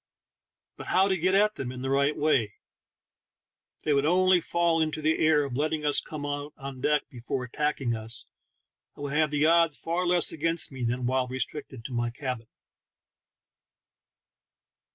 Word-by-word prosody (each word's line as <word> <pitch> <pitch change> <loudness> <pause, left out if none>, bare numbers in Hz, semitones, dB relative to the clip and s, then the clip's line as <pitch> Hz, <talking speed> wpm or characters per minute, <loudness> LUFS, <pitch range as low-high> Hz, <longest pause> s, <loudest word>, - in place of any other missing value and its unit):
But - - -9
how 190 +1 +3
to 190 - +2
get 185 +2 +1
at 210 +2 +4
them 125 -2 -4
in 125 0 -7
the 135 - -2
right 140 +2 +2
way? 130 -9 +1 1.2
If - - -26
they 150 - +2
would 140 0 +2
only 185 +1 +4
fall 170 -1 +1
into 155 0 -1
the 155 +1 +1
error 155 -2 +4
of 130 -3 -5
let 150 +4 +1
ting 155 -1 -3
us 145 - +4
come 150 -2 -7
out 145 +1 -4
on 135 -1 -8
deck 150 +2 +2
before 125 +1 -4
attacking 135 -1 -1
us, 110 +1 -7 0.7
I - - -10
would 145 -1 -4
have 155 0 +2
the 150 +1 +1
odds 165 -2 +4
far 175 +2 -2
less 175 -1 +2
against 165 +1 +1
me 130 -2 -6
than 120 +1 -1
while 130 0 +1
restricted 130 -1 -5
to 130 - -6
my 120 0 0
cabin. 125 -2 -5
145 Hz, 175 wpm, -27 LUFS, 130-160 Hz, 1.2 s, at